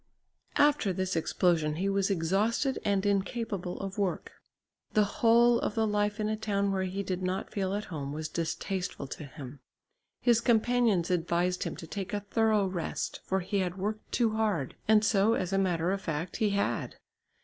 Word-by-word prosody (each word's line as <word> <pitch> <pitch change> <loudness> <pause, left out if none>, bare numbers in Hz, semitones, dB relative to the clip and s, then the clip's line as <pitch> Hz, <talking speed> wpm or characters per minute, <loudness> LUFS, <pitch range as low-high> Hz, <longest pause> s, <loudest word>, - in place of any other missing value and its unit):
After 290 -9 +4
this 185 0 -2
explosion 160 -2 +1
he 185 +5 -1
was 195 0 +1
exhausted 200 - +1
and 200 -1 +1
incapable 200 -2 -1
of 195 +1 -5
work. 195 -3 -1 0.6
The 215 - +5 0.2
whole 235 +1 +5
of - - -2
the 225 -1 +2
life 210 0 0
in 210 - 0
a 215 - 0
town 200 -2 0
where 190 -1 0
he 190 +2 -3
did 185 -1 -3
not 185 +1 -2
feel 195 -1 -1
at 210 - -2
home 140 -2 -4
was 155 +1 -4
distasteful 175 +1 -3
to 145 +3 -7
him. 140 -1 -10 0.6
His 235 -2 +3
companions 230 -6 +2
advised 175 +1 0
him - - -3
to - - -8
take 195 +4 -5
a 205 - -2
thorough 215 0 +2
rest, 185 -3 -3
for 190 0 0
he 195 +3 -1
had 180 -1 -2
worked 210 +3 -4
too 230 -3 +2
hard, 210 -11 -1
and 215 0 +5
so, 210 +1 +3
as 185 +1 -2
a 195 - +3
matter 175 -2 +1
of 195 0 -2
fact, 165 0 -3
he 215 - +2
had. 200 0 -1
195 Hz, 180 wpm, -29 LUFS, 180-215 Hz, 0.6 s, The